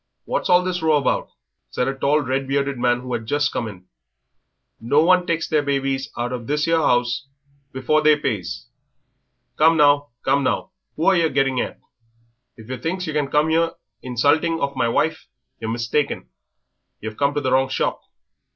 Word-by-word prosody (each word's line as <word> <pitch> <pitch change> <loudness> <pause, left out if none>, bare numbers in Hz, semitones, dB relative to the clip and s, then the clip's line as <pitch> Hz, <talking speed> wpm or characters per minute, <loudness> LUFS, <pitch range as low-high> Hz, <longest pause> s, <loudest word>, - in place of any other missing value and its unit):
"What's - - -2
all 180 0 +5
this 180 -1 -2
row 160 -1 +3
about?" 140 - 0 0.4
said 125 - -1
a 135 - 0
tall, 140 +3 +1
red 135 0 -2
bearded 140 -1 -1
man 120 0 +1
who 125 0 -6
had 110 - -4
just 145 +3 +1
come 115 - -2
in; 95 -4 -11 0.9
"no 140 +7 +3
one 180 +1 +4
takes 165 -1 -1
their 155 -2 +2
babies 135 -1 -1
out 120 +1 -2
of 120 -2 -6
this 150 +2 0
'ere 165 -1 +3
'ouse 120 -1 +1 0.4
before 130 +4 +1
they 155 0 +5
pays. 90 - -3 0.9
Come 160 +1 +5
now, 145 -1 +4 0.2
come 140 - +2
now, 160 - -1 0.2
who 160 - -2
are 195 - +5
yer 165 -2 +2
getting 135 -2 +1
at? - - -5 0.8
If 110 -1 -13
yer 130 0 -4
thinks 180 +8 -3
yer 155 - -4
can 150 -2 0
come 150 +2 +2
here 165 +1 +2 0.3
insulting 145 +7 +1
of 140 -2 -2
my 125 -2 +1
wife 160 +7 0 0.3
yer 110 -1 -4
mistaken; 120 +5 -1 0.7
yer've 110 0 -6
come 140 +2 0
to 145 - 0
the 130 -2 -1
wrong 130 0 +3
shop." - - -1
140 Hz, 185 wpm, -22 LUFS, 125-155 Hz, 0.9 s, all